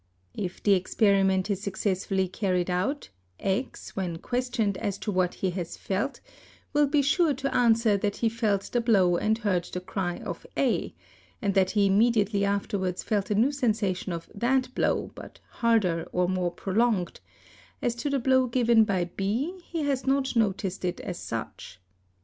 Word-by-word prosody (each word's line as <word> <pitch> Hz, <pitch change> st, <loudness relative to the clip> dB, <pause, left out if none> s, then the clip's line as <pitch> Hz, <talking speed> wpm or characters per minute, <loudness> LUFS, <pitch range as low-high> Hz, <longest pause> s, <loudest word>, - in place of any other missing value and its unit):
If 180 Hz, -3 st, -5 dB
the 205 Hz, -, +5 dB
experiment 195 Hz, 0 st, +2 dB
is 195 Hz, -1 st, -2 dB
successfully 190 Hz, -1 st, -1 dB
carried 185 Hz, -2 st, -1 dB
out, 210 Hz, +12 st, -1 dB, 0.3 s
X, 200 Hz, +7 st, -3 dB
when 180 Hz, -4 st, -2 dB
questioned 245 Hz, -1 st, -1 dB
as 200 Hz, -1 st, -2 dB
to 210 Hz, -, -3 dB
what 185 Hz, -2 st, +1 dB
he 190 Hz, -, -1 dB
has 175 Hz, -2 st, -5 dB
felt, 205 Hz, +9 st, -2 dB, 0.5 s
will 295 Hz, 0 st, +4 dB
be 285 Hz, 0 st, +2 dB
sure 295 Hz, +1 st, +3 dB
to 275 Hz, +1 st, -3 dB
answer 230 Hz, -3 st, +4 dB
that 205 Hz, 0 st, -1 dB
he 230 Hz, -, 0 dB
felt 220 Hz, -3 st, 0 dB
the 240 Hz, -, +1 dB
blow 190 Hz, -7 st, +3 dB
and 220 Hz, +4 st, +1 dB
heard 195 Hz, -6 st, 0 dB
the 180 Hz, -, -5 dB
cry 180 Hz, -1 st, -3 dB
of -, -, -6 dB
A -, -, 0 dB, 0.4 s
and 200 Hz, -, 0 dB
that 190 Hz, -1 st, +3 dB
he 200 Hz, -, +5 dB
immediately 205 Hz, 0 st, +3 dB
afterwards 200 Hz, -2 st, -1 dB
felt 205 Hz, -3 st, -1 dB
a 210 Hz, -, +1 dB
new 235 Hz, +7 st, +3 dB
sensation 215 Hz, -9 st, -1 dB
of 170 Hz, -1 st, -5 dB
that 255 Hz, +4 st, 0 dB
blow -, -, 0 dB
but -, -, -11 dB
harder 205 Hz, -8 st, +1 dB
or 180 Hz, 0 st, +1 dB
more 180 Hz, -1 st, 0 dB
prolonged; 195 Hz, 0 st, 0 dB, 0.6 s
as 240 Hz, -, 0 dB
to 290 Hz, +5 st, -2 dB
the 280 Hz, -, +1 dB
blow 260 Hz, 0 st, +3 dB
given 235 Hz, -2 st, +4 dB
by 190 Hz, -4 st, 0 dB
B 225 Hz, -, -2 dB
he 330 Hz, -3 st, -4 dB
has 275 Hz, -2 st, -1 dB
not 270 Hz, -1 st, +1 dB
noticed 195 Hz, -4 st, 0 dB
it 180 Hz, -1 st, -2 dB
as -, -, -5 dB
such. 90 Hz, -, -6 dB
205 Hz, 170 wpm, -27 LUFS, 185-240 Hz, 0.6 s, the